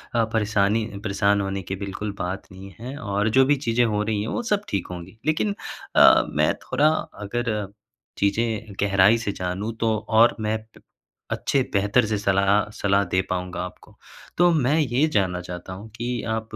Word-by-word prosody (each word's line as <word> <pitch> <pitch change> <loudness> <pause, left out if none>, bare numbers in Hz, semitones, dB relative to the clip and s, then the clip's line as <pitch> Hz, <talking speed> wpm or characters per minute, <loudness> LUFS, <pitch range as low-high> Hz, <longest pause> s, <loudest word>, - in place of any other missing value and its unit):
अ, 115 - +4
परेशानी 105 0 +1 0.2
परेशान 100 0 +2
होने 95 0 -3
की - - 0
बिल्कुल 100 +2 -4
बात 95 +2 -4
नहीं 95 0 -11
है 130 +4 -7
और 105 -2 -1
जो 135 - +7
भी 145 - +3
चीज़ें 115 +1 +3
हो 105 -2 0
रही 110 -1 -1
हैं, 105 - -3
वो 240 - -2
सब 205 - +3
ठीक 100 -3 -2
होंगी। 90 +4 -9
लेकिन 155 +7 +1 0.4
अ, - - +7
मैं - - +2
थोड़ा 145 +4 +2 0.4
अगर 110 -1 -2 0.5
चीज़ें 110 +1 -1
गहराई 100 +2 +4
से 115 -3 -3
जानूँ 95 +5 -3
तो 110 -1 +1
और 115 +1 +5
मैं 110 0 0 0.2
प - - -18 0.5
अच्छे 140 - +1
बेहतर 100 +4 +3
से 105 -1 -1
सलाह 100 +1 +2
सलाह 100 0 +2
दे 95 - +3
पाऊँगा 90 0 -3
आपको, 90 - -13 0.4
तो 175 +1 +5
मैं 145 -1 +2
ये 140 +1 +2
जानना 95 -7 0
चाहता 90 +1 -7
हूँ 100 +4 -9
कि 120 0 -4 0.2
आप 110 0 -3
105 Hz, 180 wpm, -24 LUFS, 100-115 Hz, 0.5 s, जो